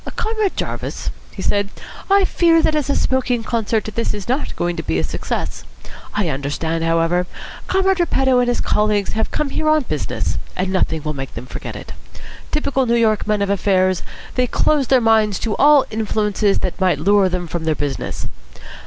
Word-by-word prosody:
"Comrade 435 -3 -1
Jarvis," - - -4 0.2
he 190 - -8
said, 200 -1 +1 0.4
"I 395 0 +5
fear 335 -3 +3
that 315 - +3
as 295 -3 -1
a 280 - +2
smoking 250 -3 0
concert 225 -1 0
this 230 -1 -1
is 205 -3 -7
not 260 +4 -1
going 175 0 -1
to - - -1
be 80 - -1
a 80 - 0
success. - - -3 0.5
I 205 -3 0
understand, 155 +3 -2
however. 165 +2 +1 0.4
Comrade 385 0 +2
Repetto 270 -7 +3
and 245 - +2
his 245 - 0
colleagues 210 -1 +1
have 220 0 -1
come 300 -2 -2
here 310 +2 0
on 310 -1 +3
business, 150 - -2 0.2
and 185 +1 -1
nothing 160 -4 0
will 150 -1 -2
make 135 -2 -7
them 115 - -6
forget - - -7
it. - - -8 0.6
Typical 270 -4 0
New 235 - +3
York 220 -3 +2
men 210 -1 +1
of 200 - 0
affairs, 185 -2 +2 0.3
they 250 -1 +1
close 285 +1 +2
their 260 0 +4
minds 220 -3 +3
to 220 -3 -2
all 290 -1 +6
influences 210 -2 +1
that 185 +1 -3
might 185 -2 +3
lure 200 -1 +3
them 180 -1 -2
from 170 0 -4
their 160 -1 +1
business. 145 -2 -4
210 Hz, 190 wpm, -19 LUFS, 180-260 Hz, 0.6 s, all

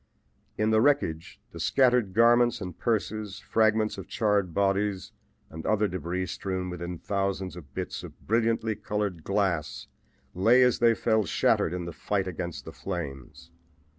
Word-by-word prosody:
In 110 +1 +1
the 110 0 +4
wreckage, 115 - +1
the - - -9
scattered 125 -7 +2
garments 120 +1 +5
and 90 -2 -6
purses, 110 -3 -2
fragments 110 -1 +1
of - - -8
charred 105 -4 +1
bodies 100 +1 0 0.4
and 80 0 -7
other 105 -1 +2
debris 90 0 -3
strewn 95 0 -4
within 90 0 -5
thousands 95 -1 -2
of 75 -6 -11
bits - - -4
of - - -11
brilliantly 115 0 +1
colored 105 -5 -3
glass, 95 -6 -1 0.5
lay 115 +8 +5
as 125 -1 +3
they 115 -1 +4
fell 110 -1 +2
shattered 80 - +2
in 90 -1 -4
the 85 - -6
fight 95 +1 -2
against 85 -1 -5
the - - -8
flames. 80 -2 -7
100 Hz, 150 wpm, -27 LUFS, 90-110 Hz, 0.5 s, garments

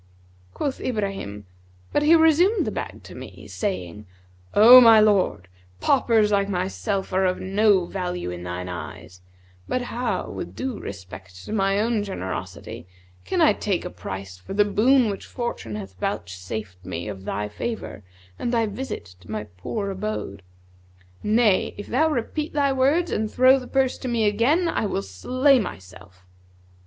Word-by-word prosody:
(Quoth 280 -2 -3
Ibrahim), 195 - -3 0.5
But - - +3
he 310 +3 +6
resumed 330 +6 +4
the - - -2
bag - - -6
to - - -11
me, - - -10
saying, 105 - -4 0.5
'O 240 +4 +10
my 225 -2 +8
lord, 200 - +2 0.3
paupers 225 -6 +3
like 200 -1 +2
myself 195 +1 -2
are 190 +1 +3
of 185 0 0
no 195 -1 +3
value 180 - -4
in 90 0 -7
thine 90 +1 -5
eyes; 90 0 -8 0.5
but 255 - -1
how, 245 0 -2
with - - -7
due 260 -4 -4
respect 95 -1 -10
to - - -5
my 195 -1 +2
own 220 -1 +1
generosity, 95 - -6 0.4
can - - 0
I - - +6
take - - -2
a - - -5
price 95 -1 -7
for 145 - -8
the 205 0 +4
boon 240 +5 +4
which 195 - -7
fortune 235 - -4
hath 100 -2 -7
vouchsafed 90 +2 -5
me 90 +1 -5
of 95 -2 -7
thy 105 +1 -2
favour 105 - -5 0.4
and 240 - -1
thy 230 -2 +2
visit 220 - -5
to 90 - -18
my 105 0 -3
poor 105 - -5
abode? 190 - -4 0.8
Nay, 215 -2 +2
if 205 - -6
thou 315 +6 +2
repeat 300 +3 -2
thy 280 -2 +2
words 285 +7 +2
and 215 0 -1
throw 260 +1 +5
the 250 - -10
purse 265 -1 +1
to - - -5
me 235 -3 +1
again 245 - +2
I 220 - 0
will 100 - -2
slay 255 - +2
myself.' 95 - -9
200 Hz, 160 wpm, -24 LUFS, -, 0.8 s, O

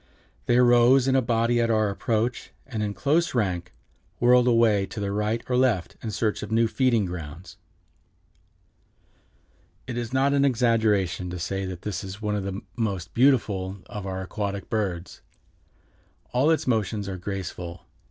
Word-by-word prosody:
They 120 - +4
arose 125 +1 +5
in 135 - +3
a 135 - +4
body 115 0 +1
at 115 - +1
our 110 -1 +2
approach, 115 +4 -1 0.2
and 115 -5 -4
in 105 -1 -2
close 155 +2 +1
rank 90 -6 -1 0.5
whirled 125 +1 +5
away 115 -5 +3
to 110 - -7
the 100 -1 -2
right 105 +3 -1
or 125 - 0
left 125 -9 +1
in 115 - -4
search 110 +1 -1
of 105 - -7
new 115 +1 +3
feeding 120 -4 +2
grounds." 85 0 -8 2.3
It 120 -1 -4
is 120 -2 -5
not 135 +2 +2
an 140 -1 +3
exaggeration 110 -8 +1
to 90 - -5
say 95 +3 -3
that 90 -1 -8
it 105 -4 -3
is 95 +1 -7
one 105 -1 -2
of 100 -2 -3
the 100 +2 -4
most 100 -7 -3
beautiful 105 -7 +2
of 100 -2 -7
our 95 0 -4
aquatic 100 0 -4
birds. 95 -5 -3 1.1
All 130 +5 +3
its 160 - +2
motions 110 -4 0
are 95 -1 -4
graceful. 90 -2 -6
110 Hz, 160 wpm, -25 LUFS, 95-120 Hz, 2.3 s, arose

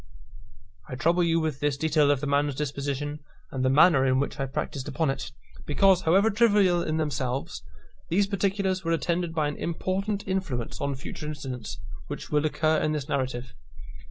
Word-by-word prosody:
I - - -4
trouble 170 +7 +2
you 165 -1 +2
with 155 -4 -2
this 145 -2 0
detail 155 -1 +3
of 145 -2 +2
the - - -2
man's 145 0 +1
disposition, 145 +1 -3 0.3
and 130 -1 -2
the 130 - +3
manner 140 0 +6
in 130 0 +3
which 140 - -2
I 135 - -1
practised 135 0 -4
upon 150 0 0
it, 135 - -5 0.4
because, 185 +4 +4
however 195 +7 +4
trivial 205 -5 +4
in 155 -2 -1
themselves, 140 -4 -2 0.5
these 195 +4 +3
particulars 195 -1 0
were 165 0 +1
attended 170 0 -1
by 155 -2 +1
an 145 - -4
important 195 +4 -2
influence 185 -12 -3
on 140 -1 -1
future 150 +3 -7
incidents 135 -5 -5 0.3
which - - -7
will 150 +1 +2
occur 155 +1 +1
in 155 - +1
this 145 -3 -3
narrative. 130 -4 -2
150 Hz, 175 wpm, -27 LUFS, 140-175 Hz, 0.5 s, manner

